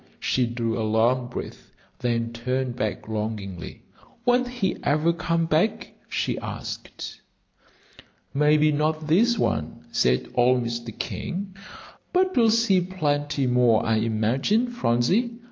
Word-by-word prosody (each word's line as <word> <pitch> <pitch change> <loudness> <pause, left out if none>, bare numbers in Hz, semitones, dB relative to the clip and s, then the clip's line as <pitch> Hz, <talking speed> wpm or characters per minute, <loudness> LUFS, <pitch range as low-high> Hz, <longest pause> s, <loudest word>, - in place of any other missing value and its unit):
She 125 -2 +1
drew 115 -1 -2
a - - 0
long 115 +3 +2
breath, 120 - -8 0.3
then 115 -1 -1
turned 125 +1 -2
back 110 -4 -3
longingly. 105 -5 -5 0.4
"Won't 245 +1 +3
he 245 -7 -2
ever 155 +4 +2
come 165 0 0
back?" 190 +8 0 0.2
she - - -1
asked. - - -7 1.1
"Maybe 150 +1 +4
not 155 +1 0
this 225 +10 +3
one," 75 - -2
said 60 0 +1
old 125 0 +3
Mr. 115 -1 -5
King; 190 +2 -4 0.6
"but 370 +1 +2
we'll 230 -2 +5
see 220 -4 +3
plenty 145 -6 -1
more, 125 -3 +3
I 110 0 +2
imagine, 115 - +1
Phronsie. 220 - +1
135 Hz, 125 wpm, -25 LUFS, 115-185 Hz, 1.1 s, we'll